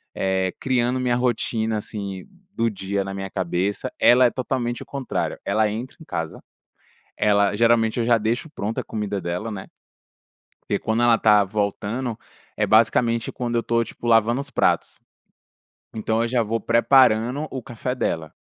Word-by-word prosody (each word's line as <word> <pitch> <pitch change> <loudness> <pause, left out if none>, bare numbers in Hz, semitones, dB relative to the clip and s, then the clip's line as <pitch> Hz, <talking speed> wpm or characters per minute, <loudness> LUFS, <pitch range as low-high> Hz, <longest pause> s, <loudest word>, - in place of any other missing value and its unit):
eh, 95 -1 0
criando 125 -1 +1
minha 125 -1 +1
rotina 115 -2 0
assim 100 -3 -6 0.3
do 115 0 +1
dia 100 -1 -3
na 95 - -5
minha 95 0 -5
cabeça. 95 +1 -2
Ela 125 +1 +6
é 120 - +5
totalmente 120 -2 -3
o - - -18
contrário. 140 -2 -3
Ela 110 -1 +2
entra 115 +5 -6
em 160 - -11
casa, 80 -1 -5 0.8
ela 100 -1 +3
geralmente 115 0 +3
eu 115 - +1
já 120 -1 +4
deixo 115 +8 -2
pronta 110 -5 -4
a - - -12
comida 105 -2 -3
dela, 90 +6 -3
né. 95 -3 -7 1.0
Porque - - +2
quando 110 +2 0
ela 120 -1 +5
está 105 -2 +5
voltando, 105 +4 -2 0.4
é - - +1
basicamente 115 +1 +2
quando 120 -1 -3
eu - - +3
estou, 115 0 +1
tipo, 120 - -9
lavando 115 +2 +3
os 140 0 -7
pratos. - - 0 0.9
Então 110 +1 -1
eu 115 - 0
já 120 -1 +1
vou 115 +1 -2
preparando 125 +3 +3
o 130 -2 -5
café 120 +2 -4
dela. 80 - -2
115 Hz, 165 wpm, -23 LUFS, 105-120 Hz, 1.0 s, Ela